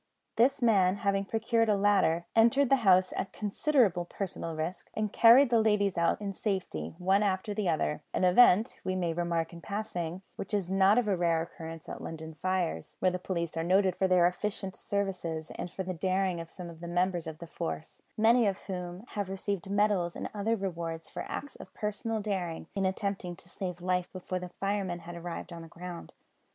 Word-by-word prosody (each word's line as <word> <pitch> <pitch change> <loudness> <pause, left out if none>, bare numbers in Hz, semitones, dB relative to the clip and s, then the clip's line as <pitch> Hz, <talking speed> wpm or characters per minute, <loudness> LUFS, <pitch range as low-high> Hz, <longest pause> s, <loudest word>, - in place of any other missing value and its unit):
This 265 +3 +3
man, 195 -5 +4
having 200 -2 0
procured 225 +1 +1
a 210 - +4
ladder, 195 -5 +3
entered 235 +4 +4
the 275 - +7
house 185 -5 +4
at 190 - -3
considerable 210 - +2
personal 175 -2 -5
risk, 160 +4 -4
and 215 -1 -1
carried 240 +3 +7
the 230 -2 +5
ladies 210 -3 +2
out 170 0 +2
in 200 -1 -4
safety, 180 - -3
one 190 +3 +3
after 200 +1 0
the 205 -3 0
other; 155 -2 0
an - - -1
event, 185 +2 +5
we 185 - -1
may 175 -3 0
remark 170 -1 -1
in 170 - -9
passing, 185 -4 -4
which 195 - -3
is 190 -3 -2
not 195 +3 +5
of 245 - +3
rare 170 -5 +2
occurrence 165 -1 -9
at - - -7
London 160 0 -7
fires, 185 - -1
where 185 - +2
the 180 - -3
police 170 -3 -3
are 165 - -1
noted 185 +1 +3
for 190 - +2
their 180 -2 +5
efficient 190 +1 -2
services 180 -5 -3
and - - -5
for 190 - -5
the 185 0 -3
daring 185 0 0
of 165 - -9
some 180 0 -8
of 165 -1 -10
the 170 - -7
members 175 -1 0
of 160 -1 -6
the 170 - -8
force, 165 -1 -6 0.2
many 225 +1 +5
of 195 -1 0
whom 180 0 -5
have 205 -3 -3
received 195 0 -3
medals 200 -4 +2
and - - -5
other 215 +2 0
rewards 170 -5 -4
for - - -5
acts 285 - -6
of - - -11
personal 215 +1 -2
daring 185 -6 -3
in 195 -2 0
attempting 190 -2 -3
to 175 - -16
save 180 -1 -5
life 180 0 0
before 185 0 -4
the 180 0 -7
firemen 195 -1 -2
had 170 +1 -8
arrived 170 +1 -6
on 170 - -7
the 165 - -10
ground. 175 +1 -8
185 Hz, 200 wpm, -30 LUFS, 170-205 Hz, 0.2 s, the